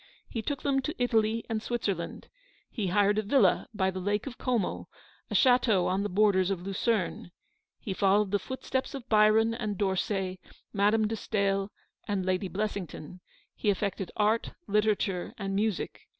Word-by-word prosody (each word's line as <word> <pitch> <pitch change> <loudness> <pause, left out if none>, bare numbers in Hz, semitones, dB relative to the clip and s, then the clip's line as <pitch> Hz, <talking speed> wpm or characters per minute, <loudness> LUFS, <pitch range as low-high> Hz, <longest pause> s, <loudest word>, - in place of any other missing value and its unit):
He 225 - -4
took 280 +4 -4
them 275 -2 +2
to 300 +4 -4
Italy 225 -2 +1
and 220 -1 -2
Switzerland. 200 -8 -3 0.4
He 210 -5 -2
hired 205 +3 +3
a - - +2
villa 245 +6 +3
by 190 -3 0
the 185 - -5
Lake 205 +3 -1
of 260 -3 -8
Como; 240 -7 -1 0.4
a - - -3
chateau 245 -7 +4
on 190 +2 +1
the 205 - -2
borders 190 -1 +3
of 185 -3 -2
Lucerne. 195 -1 -1 0.5
He 195 - -4
followed 200 +1 +2
the 205 - +2
footsteps 260 +4 -3
of 265 -4 -8
Byron 215 +1 +5
and 215 -4 -3
D'Orsay, 190 -1 -1 0.3
Madame 210 +2 +3
de 225 - -2
Stael 200 -2 -1 0.4
and 195 -3 -1
Lady 185 +1 0
Blessington; 185 -4 -5 0.3
he 210 - 0
affected 195 -1 -1
art, 215 +2 +1
literature, 205 -3 0
and 195 -2 -3
music. 210 -1 -2
205 Hz, 160 wpm, -29 LUFS, 195-225 Hz, 0.5 s, Byron